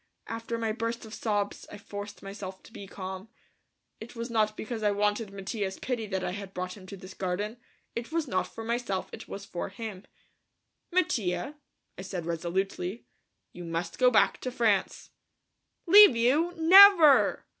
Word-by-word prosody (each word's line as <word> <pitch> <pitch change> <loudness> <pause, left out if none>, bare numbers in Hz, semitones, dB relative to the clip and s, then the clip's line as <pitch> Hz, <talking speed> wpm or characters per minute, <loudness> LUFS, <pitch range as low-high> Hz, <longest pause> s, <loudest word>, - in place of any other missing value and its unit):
After 230 +1 -5
my 225 -1 -1
burst 230 +1 -4
of 220 - -11
sobs 205 -3 -2
I - - -8
forced 205 0 -9
myself 195 -1 -8
to - - -17
be 200 - -9
calm. 190 +2 -7 0.7
It 230 +2 -10
was 235 +1 -5
not 215 -2 +1
because 225 0 -5
I 210 - +2
wanted 205 +1 0
Mattia's 195 0 -4
pity 240 -4 -3
that 190 -2 -3
I - - -2
had 200 0 -8
brought 180 0 -4
him 190 -3 -14
to 200 - -9
this 185 +1 -11
garden, 200 +5 -3 0.4
it 235 +4 -5
was 325 -2 -1
not 185 -6 -1
for 225 - -9
myself; 230 -4 -2
it - - -9
was 200 0 -8
for 175 -1 -5
him. 200 -1 -8 0.9
"Mattia," 225 - 0 0.5
I - - -4
said 185 -3 -5
resolutely, 180 +4 -3 0.5
"you 175 - -9
must 170 0 -4
go 250 -1 +6
back 230 - +2
to 255 - -3
France." 225 -5 0 0.7
"Leave 400 - +9
you? 275 +9 +2
Never!" 340 -3 +7
210 Hz, 165 wpm, -28 LUFS, 190-235 Hz, 0.9 s, Leave